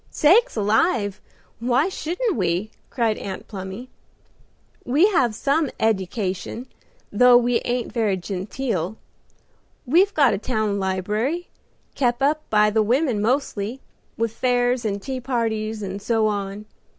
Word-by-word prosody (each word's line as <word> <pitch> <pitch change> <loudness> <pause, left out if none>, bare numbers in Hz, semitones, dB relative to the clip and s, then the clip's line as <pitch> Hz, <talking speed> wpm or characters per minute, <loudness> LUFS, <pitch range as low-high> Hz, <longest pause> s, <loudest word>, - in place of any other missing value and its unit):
"Sakes 410 +12 +4
alive, 210 - +1 0.4
why 250 +6 +2
shouldn't 380 +5 -2
we?" 185 +1 -1 0.2
cried 230 -4 0
Aunt 190 -1 -6
Plumy. 195 +4 -7 1.0
"We 285 +9 +3
have 250 - +2
some 285 +4 +1
eddication, 200 +1 -1 0.5
though 245 +3 +6
we 245 0 +2
ain't 245 0 -2
very 215 -5 +1
genteel. 195 +1 -3 0.9
We've 355 +10 +4
got 280 - +4
a - - -2
town 215 -4 -1
libry, 210 - -2 0.4
kep 240 -3 0
up 295 +3 +2
by 210 0 +4
the 220 +1 +2
women 240 0 +1
mostly, 235 -1 -1 0.4
with 230 -1 -1
fairs 245 -1 +1
and 200 -1 -1
tea 260 +4 -5
parties 225 -4 -2
and 195 +1 -5
so 225 0 +1
on. 205 0 -3
230 Hz, 125 wpm, -23 LUFS, 205-260 Hz, 1.0 s, though